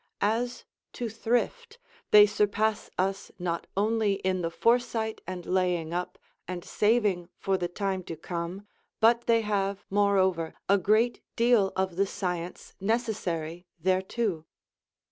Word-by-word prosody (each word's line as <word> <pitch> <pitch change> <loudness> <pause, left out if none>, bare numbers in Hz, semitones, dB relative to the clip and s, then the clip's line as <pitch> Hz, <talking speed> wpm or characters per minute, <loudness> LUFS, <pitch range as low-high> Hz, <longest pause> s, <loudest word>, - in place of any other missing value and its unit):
As 235 +4 0 0.3
to 240 -2 -3
thrift, 245 - -1 0.3
they 210 0 +9
surpass 210 +1 0
us 195 +2 -1
not 170 -2 -3
only 215 0 +2
in 185 -1 -1
the 165 - -1
foresight 225 +3 +1
and 180 -1 -5
laying 180 -3 0
up, 180 +1 -3 0.3
and 180 -1 -5
saving 210 -5 +1
for 195 - 0
the 180 -2 -1
time 190 +1 -2
to 165 - -5
come, 175 +4 -5 0.3
but 235 +1 +4
they 230 -1 +4
have, 200 -1 -1
moreover, 190 -5 +2
a 200 +1 +4
great 215 +6 +2
deal 230 -5 +4
of 190 -2 -1
the 195 +1 +2
science 180 -2 -4
necessary 185 -6 -2
thereto. 185 -2 0
195 Hz, 130 wpm, -28 LUFS, 180-220 Hz, 0.3 s, they